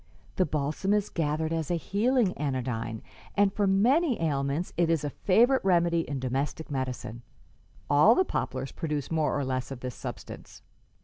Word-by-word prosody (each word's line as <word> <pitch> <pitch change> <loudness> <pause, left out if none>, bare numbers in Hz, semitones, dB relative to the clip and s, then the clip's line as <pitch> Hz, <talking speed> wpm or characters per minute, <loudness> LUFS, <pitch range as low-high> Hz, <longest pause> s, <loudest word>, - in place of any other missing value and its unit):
The 185 - +2
balsam 155 +7 -1
is 210 -1 0
gathered 160 0 -1
as 160 -2 -2
a 175 - +1
healing 205 - +1
anodyne, 125 -5 -3 0.3
and 200 -1 +4
for 205 -1 +1
many 245 - +3
ailments 145 +1 -1
it 170 -1 +2
is 165 -3 +1
a 145 - -2
favorite 240 - +3
remedy 170 -3 +2
in 140 -2 -3
domestic 135 +5 -3
medicine. 130 -3 -4 0.7
All 150 +11 +6
the 375 - +3
poplars 130 - -3
produce 150 -4 -4
more 155 -2 +1
or 140 - -1
less 130 -1 -2
of 135 -3 -7
this 125 -1 -4
substance. - - -9
155 Hz, 165 wpm, -28 LUFS, 135-195 Hz, 0.7 s, All